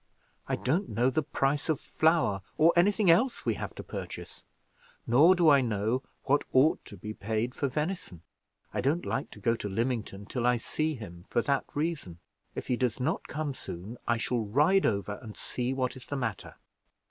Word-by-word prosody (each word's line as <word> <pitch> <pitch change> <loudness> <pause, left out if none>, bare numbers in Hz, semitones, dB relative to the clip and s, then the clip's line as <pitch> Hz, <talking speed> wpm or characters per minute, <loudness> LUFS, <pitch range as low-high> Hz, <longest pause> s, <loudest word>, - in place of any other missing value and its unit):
I - - +2
don't 170 +10 0
know 120 +5 +2
the 155 - +1
price 140 0 0
of 155 - +2
flour, 155 - +2 0.2
or 160 +2 +6
anything 195 +1 +5
else 240 +9 +2
we 115 - +2
have - - -6
to - - -7
purchase, - - -7 0.6
nor 150 +10 +6
do 175 -2 +3
I 140 -1 +6
know 115 +1 0 0.2
what 145 +2 +2
I - - -40
ought 135 +5 +4
to - - -10
be 105 0 -6
paid 110 +4 -2
for 140 - -1
venison. 150 - -3 0.5
I - - 0
don't 155 +6 +1
like 135 - -2
to - - -12
go 115 -2 +2
to 105 - -5
Lymington 110 -2 -2
till 120 +2 -1
I 125 0 +4
see 155 +6 -1
him 90 -7 -10
for 120 - +1
that 140 -1 +1
reason. 145 - -2 0.4
If - - -4
he 125 - 0
does 125 -1 0
not 140 +6 -1
come 155 -2 -3
soon, 115 -3 -8
I 120 - +3
shall 120 +1 0
ride 150 - +3
over 100 0 -1
and 110 -4 -10
see 125 0 -2
what 130 -1 -1
is 130 - -12
the 145 - -3
matter." 125 - -4
130 Hz, 195 wpm, -29 LUFS, 115-155 Hz, 0.6 s, or